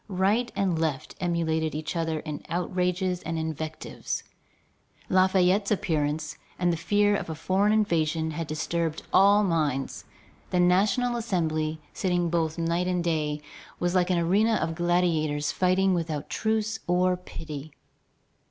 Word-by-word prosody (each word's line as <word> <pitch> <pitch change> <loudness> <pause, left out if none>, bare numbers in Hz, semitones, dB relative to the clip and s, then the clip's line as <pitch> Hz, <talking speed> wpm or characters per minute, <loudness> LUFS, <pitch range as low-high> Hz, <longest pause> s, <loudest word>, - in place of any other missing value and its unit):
Right 205 +5 +1
and 185 -5 +1
left 155 -5 -2
emulated 160 -3 0
each 155 +3 -4
other 160 -2 -1
in 150 -2 -6
outrages 180 +1 -1
and 165 +1 -3
invectives. 160 0 -4 0.9
Lafayette's 185 +1 +3
appearance 155 -5 -1 0.2
and 175 -1 +2
the - - -2
fear 205 +4 +2
of 195 - -3
a 160 - -3
foreign 195 +6 +1
invasion 165 -7 +1
had 165 0 -4
disturbed 160 +1 -2
all 200 +2 +6
minds. 150 -7 -1 0.4
The 180 - +1
National 200 +7 +3
Assembly, 160 -8 -1
sitting 175 -3 0
both 160 -2 0
day 170 +1 0
and 180 -1 -1
night, 150 -3 -1 0.4
was 175 0 0
like 180 -1 +2
an 180 - +2
arena 200 +7 +3
of 165 - -1
gladiators 165 -4 +1
fighting 185 +1 +2
without 160 -4 -3
truce 220 0 0
or 180 +1 +3
pity. 155 -4 -8
175 Hz, 135 wpm, -27 LUFS, 160-185 Hz, 0.9 s, all